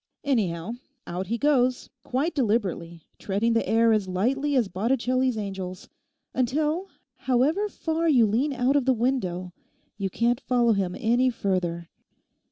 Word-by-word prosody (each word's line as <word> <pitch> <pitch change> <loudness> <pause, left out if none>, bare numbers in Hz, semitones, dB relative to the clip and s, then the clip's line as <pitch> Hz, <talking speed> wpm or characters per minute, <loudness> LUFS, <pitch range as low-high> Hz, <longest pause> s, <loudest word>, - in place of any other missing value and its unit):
Anyhow, 200 - 0 0.3
out 180 +2 -4
he 230 +4 -1
goes 255 -3 +1
quite 280 +7 -1
deliberately, 195 - -1 0.2
treading 210 +4 0
the 230 - 0
air 225 0 +4
as 210 -3 0
lightly 265 +10 0
as 245 -5 +3
Botticelli's 250 +5 0
angels, 190 -3 -6 0.4
until, 305 +9 0 0.3
however 290 +11 +1
far 325 -2 -1
you 250 -7 +5
lean 240 +8 +1
out 260 +1 +1
of 280 -3 +2
the 265 - +4
window, 185 -8 -1 0.5
you 195 -1 -1
can't 235 +6 0
follow 240 -3 +2
him 190 -3 -1
any 245 +2 +2
further. 180 -7 -2
235 Hz, 140 wpm, -25 LUFS, 195-265 Hz, 0.5 s, you